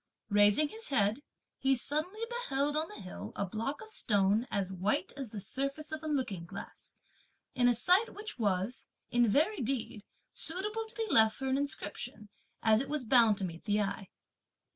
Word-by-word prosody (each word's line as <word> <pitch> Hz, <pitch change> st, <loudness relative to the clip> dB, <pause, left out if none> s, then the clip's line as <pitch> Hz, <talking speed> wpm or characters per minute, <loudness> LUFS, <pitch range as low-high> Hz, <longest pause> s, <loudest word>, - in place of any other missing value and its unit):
Raising 205 Hz, +8 st, +5 dB
his 445 Hz, +1 st, -5 dB
head, 220 Hz, -1 st, +1 dB, 0.4 s
he 270 Hz, 0 st, +3 dB
suddenly 310 Hz, -, -2 dB
beheld 295 Hz, -, -1 dB
on 310 Hz, +1 st, +1 dB
the 420 Hz, -, -10 dB
hill 185 Hz, -, -8 dB
a 200 Hz, -, -1 dB
block 225 Hz, +9 st, -4 dB
of 435 Hz, -, -12 dB
stone, 205 Hz, -, +2 dB
as 195 Hz, -2 st, -1 dB
white 200 Hz, +9 st, -1 dB
as 270 Hz, -4 st, -5 dB
the 210 Hz, -, -6 dB
surface 275 Hz, +9 st, -3 dB
of 310 Hz, 0 st, -4 dB
a 315 Hz, -, -6 dB
looking 255 Hz, -, -2 dB
glass, 195 Hz, +2 st, -9 dB, 0.6 s
in 245 Hz, -1 st, +3 dB
a 245 Hz, -, +4 dB
site 365 Hz, -, +3 dB
which 425 Hz, -, -6 dB
was, 205 Hz, +2 st, -1 dB, 0.2 s
in 240 Hz, -1 st, +4 dB
very 320 Hz, -, +2 dB
deed, 230 Hz, -4 st, -2 dB, 0.3 s
suitable 420 Hz, +6 st, +1 dB
to 440 Hz, -, -9 dB
be 455 Hz, -, -1 dB
left 220 Hz, -1 st, +7 dB
for 270 Hz, -, -5 dB
an 260 Hz, -, +1 dB
inscription, 245 Hz, -5 st, -4 dB, 0.3 s
as 220 Hz, 0 st, +5 dB
it 275 Hz, -, -5 dB
was 295 Hz, -4 st, -2 dB
bound 230 Hz, -3 st, +5 dB
to 195 Hz, -, -2 dB
meet 170 Hz, +2 st, -8 dB
the 210 Hz, -1 st, +1 dB
eye. 200 Hz, -1 st, -3 dB
250 Hz, 185 wpm, -32 LUFS, 205-305 Hz, 0.6 s, left